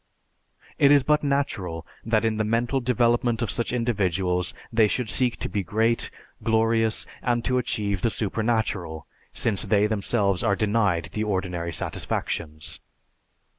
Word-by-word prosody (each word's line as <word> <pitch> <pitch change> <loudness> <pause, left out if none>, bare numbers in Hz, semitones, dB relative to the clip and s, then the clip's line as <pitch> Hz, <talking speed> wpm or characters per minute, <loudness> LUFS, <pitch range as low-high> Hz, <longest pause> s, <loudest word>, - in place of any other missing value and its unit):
It 140 - +6
is 145 -2 +6
but 150 +2 +3
natural 100 - -1 0.2
that 110 0 +1
in 110 -1 0
the 110 - +1
mental 115 +5 +1
development 120 -1 +1
of 115 - -1
such 120 - -1
individuals 95 -7 0 0.2
they 110 -1 +5
should 120 +1 -1
seek 125 -2 +2
to - - -2
be 100 - -2
great, 110 +5 +1 0.3
glorious, 110 0 +1 0.2
and 120 -1 0
to 125 -1 +2
achieve 100 -5 -1
the 115 - +2
supernatural, 105 -7 -1 0.3
since 105 -4 +1
they, 105 0 +3
themselves, 100 -2 +1
are 100 - +2
denied 100 -5 +1
the 110 - -1
ordinary 90 -4 -2
satisfactions. 75 -1 -3
110 Hz, 140 wpm, -25 LUFS, 100-120 Hz, 0.3 s, It